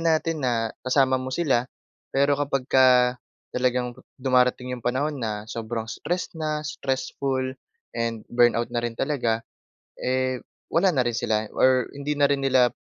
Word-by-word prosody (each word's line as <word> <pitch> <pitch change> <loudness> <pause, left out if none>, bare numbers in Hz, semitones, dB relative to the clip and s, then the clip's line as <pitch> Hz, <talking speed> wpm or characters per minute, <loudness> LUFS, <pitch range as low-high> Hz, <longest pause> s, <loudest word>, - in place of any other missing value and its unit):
natin 160 0 -2
na, 115 -4 0 0.2
kasama 130 -1 +3
mo 130 - -5
sila, 135 -7 +1 0.5
pero 140 +1 +4
kapagka 130 -3 +3 0.3
talagang, 125 -1 0 0.2
dumarating 125 -1 +2
'yong 125 -2 -5
panahon 140 +3 0
na 105 -2 -3
sobrang 115 0 -3
stress 175 +4 -3
na, 155 -2 -3
stressful, 135 -1 -2 0.5
and 115 -1 -2
burn 120 0 +4
out 115 0 -1
na 120 - 0
rin 120 -1 -3
talaga, 115 -6 0 0.6
eh, 130 0 0 0.3
wala 180 +3 +4
na 130 -7 +1
rin 120 - 0
sila. 110 -1 0
Or 130 -1 +4
hindi 145 +1 -2
na 145 - +5
rin 140 -1 0
nila, 130 -2 +4
130 Hz, 150 wpm, -25 LUFS, 120-140 Hz, 0.6 s, na